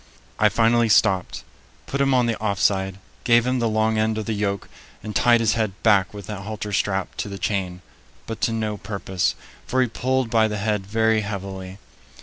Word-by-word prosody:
I 105 - +5
finally 115 +2 +3
stopped, 95 -3 +2 0.4
put 140 - -2
him 135 0 +3
on 125 -2 +3
the 115 -1 0
off 100 -3 -1
side, 95 -1 +1 0.3
gave 120 -1 +4
him 125 0 0
the 115 -1 +1
long 110 0 +1
end 110 0 +1
of 110 - -3
the 115 - -2
yoke, 100 -1 -2 0.4
and 105 - -6
tied 120 -1 +4
his 110 -2 +2
head 110 -4 -1
back 100 -5 +4
with 100 -2 -9
the 105 +1 -5
halter 105 0 -5
strap 95 -2 -1
to - - -3
the 100 - -6
chain; 95 -3 -2 0.4
but 115 -2 -6
to 115 - +2
no 110 -2 -2
purpose, 95 -2 -2 0.3
for 130 - 0
he 130 - +3
pulled 130 +1 -1
by 110 -1 +4
the 105 -1 -3
head 105 -2 -1
very 110 +1 +2
heavily. 95 -2 -6
110 Hz, 200 wpm, -23 LUFS, 100-115 Hz, 0.4 s, I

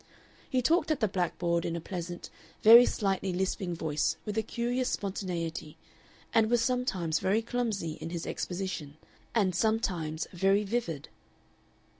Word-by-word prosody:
He 255 -1 +1
talked 320 +3 +3
at 310 - +1
the 215 - +2
blackboard 175 -2 0
in 170 -1 -2
a - - -2
pleasant, 175 0 -6 0.3
very 235 +3 +10
slightly 195 -2 0
lisping 185 0 -1
voice 155 -2 0
with 210 - -3
a 220 - +2
curious 245 +3 -1
spontaneity, 170 -5 -3 0.6
and 220 -1 +4
was 240 0 +3
sometimes 195 -11 0
very 210 +4 +1
clumsy 220 -9 -2
in - - -4
his 170 -1 -4
exposition, 175 -5 -4 0.4
and 195 -5 +3
sometimes 175 -6 0
very 195 +3 +3
vivid. 195 - -3
190 Hz, 140 wpm, -30 LUFS, 170-225 Hz, 0.6 s, very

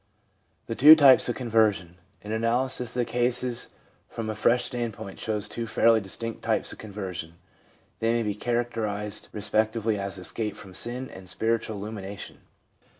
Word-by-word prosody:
4. 115 - -4
Two 150 +4 +10
Types 140 -5 +6
of 120 - -1
Conversion. 110 -7 +1
— 100 - -33
An 105 - -6
analysis 120 +2 0
of - - -1
the 120 - +2
cases 125 0 -1 0.4
from 110 -1 -4
a - - -3
fresh 120 +3 +2
standpoint 120 -6 -4
shows 105 -2 -1
two 115 +1 -4
fairly 115 0 +4
distinct 115 +4 -5
types - - 0
of - - -14
conversion. 95 -6 -6 0.6
They 115 0 +1
may 120 0 +1
be 105 -1 -1
characterised 105 -2 -2
re 105 - -6
spectively 110 0 0
as 100 0 -4
escape 105 +4 -4
from 95 -2 -11
sin 125 +6 -3
and 95 -1 -11
spiritual 110 +2 -1
illumination. 100 -1 -7
110 Hz, 160 wpm, -26 LUFS, 105-120 Hz, 0.6 s, Two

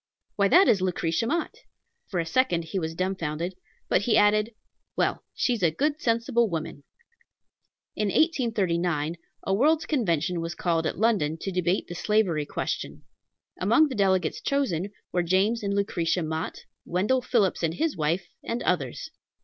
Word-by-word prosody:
"Why, 200 -1 +3
that 370 - +6
is 195 - +4
Lucretia 180 +2 0
Mott!" 330 +5 -1 0.5
For 180 - -2
a 165 - 0
second 175 -3 +1
he 190 +4 -3
was 160 -1 -4
dumbfounded; 175 -2 -2 0.3
but - - +2
he 220 +2 +2
added, 210 +2 +3 0.4
"Well, - - 0
she's 240 -5 0
a 170 - +4
good, 290 - -1
sensible 230 0 +1
woman." 155 -4 -5 1.1
In 210 - 0
1839 180 - +1 0.3
a 195 - 0
World's 300 +9 +3
Convention 175 - 0
was 165 +1 -4
called 165 -2 0
at - - -4
London 195 -8 +1
to 195 - -3
debate 180 0 0
the - - -6
slavery 175 -6 +1
question. - - -4 0.6
Among 310 -2 +4
the - - -4
delegates 190 -5 +1
chosen 205 - 0 0.2
were 175 - +1
James 190 +6 +2
and 200 -1 -1
Lucretia 180 -4 0
Mott, 160 +1 -4 0.2
Wendell 210 +9 +1
Phillips 225 -7 +1
and 165 -1 0
his 320 - 0
wife, 160 +4 -1 0.2
and 235 +1 -3
others. 140 -9 -1
190 Hz, 155 wpm, -26 LUFS, 170-230 Hz, 1.1 s, that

